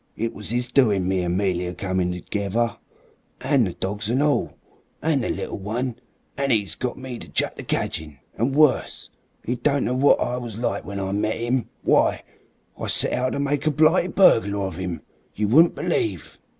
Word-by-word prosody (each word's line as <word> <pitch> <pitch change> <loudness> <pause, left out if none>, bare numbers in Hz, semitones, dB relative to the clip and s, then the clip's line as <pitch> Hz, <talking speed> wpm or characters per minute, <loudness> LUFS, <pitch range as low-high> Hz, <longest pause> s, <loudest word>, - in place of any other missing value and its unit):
It 115 +1 -2
was 105 +1 -6
'is 120 +1 0
doing 105 -8 +3
me 95 -1 +1
and 90 0 -1
'Melia 90 -2 -1
come 95 -2 -1
together. 100 +6 -2 0.7
An' 135 -3 +3
the 90 - -3
dogs 105 +4 -3
an' 125 +3 +1
all. 145 0 +1 0.4
An' 155 -3 +1
the - - -2
little - - -4
one. 115 +5 -3 0.4
An' 140 -1 0
'e 105 -4 +2
got 125 -1 -3
me 130 -3 -7
to - - -9
chuck - - +1
the - - -7
cadgin'. 75 -3 -3 0.2
An' 125 +4 0
worse. 150 -1 +2 0.3
'E 120 - 0
don't 140 +3 +1
know 125 - 0
what 135 +3 +4
I 125 - -1
was 120 -4 -6
like 120 - -2
when 100 0 -5
I 95 0 -2
met 105 +2 0
'im. 120 +1 -1
Why, - - +3 0.6
I - - -3
set - - +1
out 130 +1 0
to - - -2
make 140 +2 0
a - - +4
blighted 160 +4 +3
burglar 100 - +4
of 95 -2 -5
'im 90 -5 -4 0.3
you 105 0 0
wouldn't 160 +10 +5
believe!" 105 - -2
115 Hz, 190 wpm, -23 LUFS, 95-135 Hz, 0.7 s, wouldn't